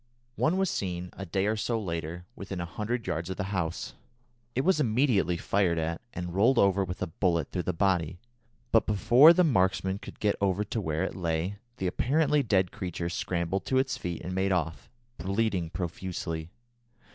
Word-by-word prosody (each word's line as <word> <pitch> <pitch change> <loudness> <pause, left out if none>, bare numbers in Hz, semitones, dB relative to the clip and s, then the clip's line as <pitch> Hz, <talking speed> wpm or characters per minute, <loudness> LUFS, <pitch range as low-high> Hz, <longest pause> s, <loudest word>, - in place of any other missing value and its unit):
One 160 +6 +2
was 190 -1 +1
seen, 90 -2 -3
a 95 - -7
day 95 +4 0
or 110 +1 +1
so 115 +2 -1
later, 85 -2 -4
within 95 -2 -6
a 85 - -2
hundred 110 +6 -3
yards 85 +3 -2
of 95 - -4
the 95 - -1
house. 85 -3 -2 0.6
It 130 - +2
was 180 +1 +3
immediately 115 - +2
fired 90 -1 +1
at, 80 +1 -2
and 90 -1 -5
rolled 115 +7 +4
over 100 -1 +4
with 90 0 -4
a - - +1
bullet 85 -2 0
through 90 - -1
the - - +4
body; 90 -1 +1 0.5
but 115 - +4
before 120 +9 +7
the 180 +1 +4
marksman 95 - +2
could - - -11
get 105 -1 +2
over 100 0 +2
to 105 +2 -3
where 80 -1 -1
it - - -2
lay, 85 +2 -1 0.2
the 95 - -3
apparently 145 - +2
dead 95 -7 +2
creature 85 -2 -4
scrambled 85 +1 -2
to 130 - +1
its 130 0 +1
feet 85 -2 -5
and 90 - -4
made 95 +1 +1
off, 85 -3 -1 0.3
bleeding 95 -1 0
profusely. 85 -1 -4
95 Hz, 185 wpm, -28 LUFS, 85-110 Hz, 0.6 s, before